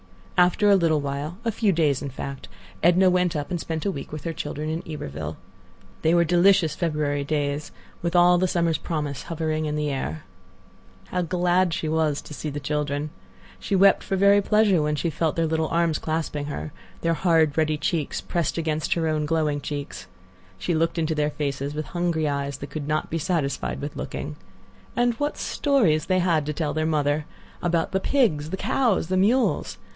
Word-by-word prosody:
After 180 +3 +4
a - - +7
little 165 -4 +3
while, 145 +4 -4
a 230 - +2
few 215 -1 +2
days, 155 -6 +2
in 140 - -4
fact, 135 +1 -7 0.3
Edna 180 +2 +5
went 180 -2 +1
up 145 +3 -3
and 175 - -1
spent 160 -1 -4
a 200 - +1
week 140 -6 -7
with 155 -1 -6
her 165 - -3
children 150 -1 -4
in 160 +2 -2
Iberville. 80 - -5 0.6
They 160 +2 +3
were 170 - +5
delicious 175 -1 +4
February 150 -4 -1
days, 145 0 -2 0.3
with 170 +1 -2
all 175 0 +6
the 185 - +2
summer's 170 -3 +1
promise 150 -5 -3
hovering 155 -1 -1
in 150 - -2
the 150 -1 -1
air. 80 - -4 0.9
How 180 - 0
glad 175 0 +1
she 160 - -3
was 155 -2 +1
to - - -10
see 150 - -4
the 145 0 -4
children! 145 0 -2 0.5
She 200 - -1
wept 195 +1 +5
for 195 - -2
very 200 +1 +5
pleasure 205 -4 +3
when 150 0 0
she 165 +3 -1
felt 160 +1 0
their 165 - +1
little 160 0 0
arms 165 -2 +1
clasping 155 -2 -2
her; 80 - -5 0.3
their 165 - +2
hard, 160 -3 +3
ruddy 155 -1 +1
cheeks 155 -1 -1
pressed 170 -2 -2
against 155 -2 0
her 165 -1 0
own 155 -1 0
glowing 150 -2 0
cheeks. 140 -11 -6 0.5
She 95 - -1
looked 165 +2 +1
into 160 -1 0
their 150 -1 +1
faces 145 -1 -3
with 155 0 -3
hungry 170 -3 0
eyes 140 -1 -2
that 140 - -8
could 150 -2 -5
not 155 0 -1
be 165 - -1
satisfied 140 - -1
with - - -5
looking. 75 - -5 0.6
And 240 0 +2
what 290 0 -1
stories 200 - +1
they 185 - +2
had 170 -5 +2
to 150 - -1
tell 150 -1 -2
their 155 +1 0
mother! 150 -1 0 0.3
About 170 -2 0
the 190 - +1
pigs, 190 - +1
the 190 - -3
cows, 225 -3 +1
the 185 - +1
mules! 230 +7 +2
160 Hz, 195 wpm, -24 LUFS, 150-175 Hz, 0.9 s, a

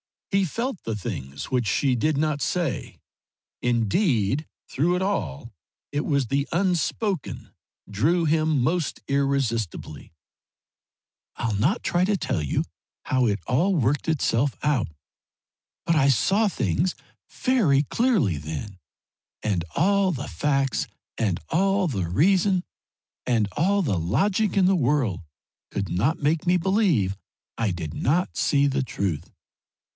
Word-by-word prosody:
He 195 -1 +3
felt 230 - -3
the 115 - -3
things 70 - -6
which 125 -3 +1
she 135 +5 +2
did 140 +5 +1
not 150 -1 0
say; 170 -7 -2 0.6
indeed 120 - +1 0.2
through 170 +7 +1
it 180 - -1
all 115 - -2 0.4
it 145 +1 -1
was 140 -5 +1
the 140 +3 0
unspoken 180 0 -1 0.4
drew 155 - +1
him 155 -3 +2
most 160 +3 -1
irresistibly. 120 - -1 1.2
"I'll 115 -2 -2
not 145 - +1
try 175 +1 +2
to 200 +1 +1
tell 80 - -1
you 75 - 0 0.4
how 130 -2 +2
it 100 -3 0
all 175 +10 +2
worked 145 0 +1
itself 140 -4 +1
out, 145 -6 +1 1.0
but 165 - +2
I 135 -2 +4
saw 195 - +3
things 160 - 0 0.3
very 195 - +2
clearly 180 - +1
then, 80 +6 -6 0.6
and 95 -6 0
all 195 +4 +3
the 140 -1 -5
facts 135 -4 0 0.3
and 100 -6 0
all 195 +2 +2
the 95 - -2
reason 185 - +3 0.6
and 115 -4 +2
all 200 +6 +3
the 100 - 0
logic 185 - +1
in 190 - +5
the 190 +1 +4
world 130 - +1 0.5
could 100 -2 -3
not 140 - 0
make 155 +4 +1
me 180 - +4
believe 170 - +1 0.4
I 115 -2 0
did 80 -4 -5
not 170 - 0
see 140 -1 +3
the 140 -1 +1
truth. 95 - -3
140 Hz, 130 wpm, -25 LUFS, 110-180 Hz, 1.2 s, in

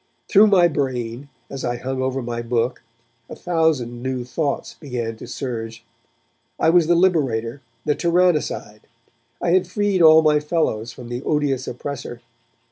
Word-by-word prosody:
Through 210 +1 +6
my 185 -4 +5
brain, 130 -3 -3 0.2
as 135 -1 -7
I 120 0 -1
hung 130 +1 -4
over 130 0 -2
my 120 0 -4
book 120 +1 -1 0.5
a - - -7
thousand 155 -9 0
new 130 -1 -3
thoughts 145 +3 -3
began 120 -6 -5
to - - -10
surge. 115 -4 -6 0.7
I 160 - +4
was 170 -2 +4
the 175 - +4
liberator, 140 -9 +1 0.2
the 150 - +2
tyrannicide; 170 -11 0 0.6
I 175 - +2
had 185 0 +3
freed 200 -1 0
all 160 0 +8
my 150 -1 +4
fellows 150 -8 -1
from 120 0 -11
the 120 +1 -4
odious 140 -3 -1
oppressor. 125 -1 -6
135 Hz, 150 wpm, -21 LUFS, 120-165 Hz, 0.7 s, all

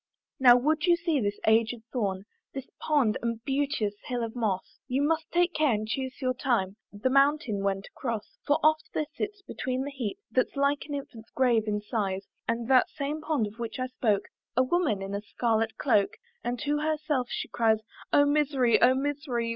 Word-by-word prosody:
Now 245 -2 +8
would 305 +5 +1
you 345 - +6
see 335 -4 0
this 205 -3 -1
aged 225 +1 +2
thorn, 200 -6 -1 0.3
This 270 -1 -4
pond 280 -9 +2
and 230 -1 -2
beauteous 275 -6 0
hill 245 -2 -2
of 225 +1 -5
moss, 210 -6 -2
You 265 +2 0
must 315 +1 0
take 350 0 +2
care 305 -5 +3
and 215 +1 -3
chuse 260 +3 -3
your 255 0 +2
time 230 -7 0
The 210 +6 -1
mountain 275 -6 +3
when 195 0 0
to - - -12
cross. 230 -5 -4
For 290 - +4
oft 310 0 +3
there 305 - +1
sits, 415 -1 -4
between 260 -7 -3
the 285 - -5
heap 265 - -4
That's 255 - +1
like 280 +1 +1
an 290 - -4
infant's 235 -5 -8
grave 235 -4 +2
in 210 0 0
size, 200 -3 -2 0.2
And 230 0 -1
that 260 -1 +5
same 295 +1 -4
pond 305 -8 0
of 210 +3 -9
which 230 -1 -4
I 255 - -1
spoke, 220 -5 0 0.3
A 255 - +6
woman 255 - +1
in 195 +1 -5
a 200 - -2
scarlet 225 +1 -1
cloak, 210 -8 +2 0.3
And 240 +1 -2
to 295 0 0
herself 305 -4 0
she - - -3
cries, 225 -2 +2 0.3
"Oh 285 - +6
misery! 285 -5 +3
oh 255 +1 +6
misery! 270 -4 -2
255 Hz, 195 wpm, -28 LUFS, 220-290 Hz, 0.3 s, Now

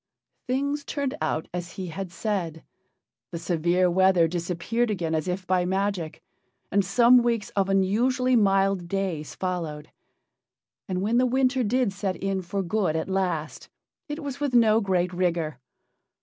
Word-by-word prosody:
Things 280 +3 -1
turned 280 -2 -2
out 160 - -1
as 175 -1 -5
he 185 -3 -5
had 185 +2 -6
said. 175 -5 -3 0.7
The 170 - -5
severe 175 +2 +1
weather 185 -1 +4
disappeared 180 +8 -1
again 170 -6 -2
as 155 +1 -1
if 185 +1 -3
by 180 -1 +2
magic, 190 -3 -2 0.5
and 200 +1 +3
some 240 +6 +5
weeks 235 -3 -1
of 195 -1 0
unusually 245 +7 +2
mild 195 -4 +2
days 180 -5 -3
followed. 165 -5 -4 1.0
And 185 0 -2
when 230 +4 +2
the 255 - +3
winter 260 +1 +2
did 240 -1 +1
set 195 -1 -2
in 195 -1 -2
for 195 +2 -3
good 180 -3 0
at 160 +3 -2
last, 180 -5 -2 0.4
it 295 +2 -5
was 280 -1 -5
with 285 -4 -1
no 225 -2 +5
great 180 -3 0
rigor. 170 -6 -1
190 Hz, 150 wpm, -26 LUFS, 175-230 Hz, 1.0 s, some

